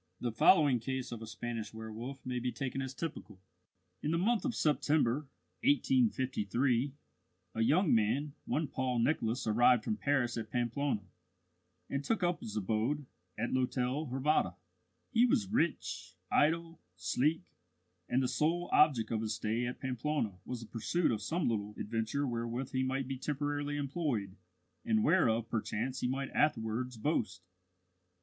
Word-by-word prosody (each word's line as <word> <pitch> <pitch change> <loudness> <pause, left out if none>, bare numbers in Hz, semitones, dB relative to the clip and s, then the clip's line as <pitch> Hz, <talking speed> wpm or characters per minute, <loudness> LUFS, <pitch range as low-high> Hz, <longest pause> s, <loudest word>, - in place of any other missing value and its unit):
The 120 - -1
following 140 - +5
case 130 +2 -3
of 115 -2 -6
a 110 - -7
Spanish 110 -1 -5
werwolf 110 +5 -7
may 125 -1 -1
be 125 +1 -1
taken 135 0 -3
as 130 -1 -3
typical: 125 - -6 0.6
In 150 - -1
the 165 - +2
month 215 +6 +2
of 255 - -1
September, 150 -2 +2 0.4
1853, 135 - +2 0.6
a 115 - -1
young 155 - +4
man, 120 +7 +1
one 155 0 0
Paul 130 -2 -1
Nicholas, 120 -1 +1
arrived 120 +1 +4
from 105 - -1
Paris 125 +1 +1
at 110 -2 -4
Pamplona, 120 0 -1 0.8
and 140 0 -2
took 195 +7 0
up 175 0 +1
his 110 -1 -6
abode 110 +8 0 0.3
at 115 +3 -1
l'Hôtel 130 +3 0
Hervada. 135 +4 +1 0.6
He 240 0 +5
was 235 -4 +2
rich, 95 - -1 0.2
idle, 165 +2 +2
sleek; 130 - +1 0.7
and 130 +2 +2
the - - +2
sole 170 +6 0
object 130 -8 +4
of 110 -1 0
his 110 -1 -1
stay 110 +3 -1
at 125 - -5
Pamplona 125 -6 -2
was 125 -2 -5
the 115 - -9
pursuit 140 +10 0
of 110 -2 -1
some 160 - -1
little 105 -2 -1
adventure 115 +6 -1
wherewith 120 +1 -3
he 130 - 0
might 130 0 -1
be 135 -1 -4
temporarily 145 +1 -2
employed, 140 - -2 0.5
and 225 -2 +2
whereof 115 - +3
perchance 115 +3 -2
he - - 0
might 135 +1 -2
afterwards 125 -3 0
boast. 105 - -1
130 Hz, 150 wpm, -33 LUFS, 115-150 Hz, 0.8 s, following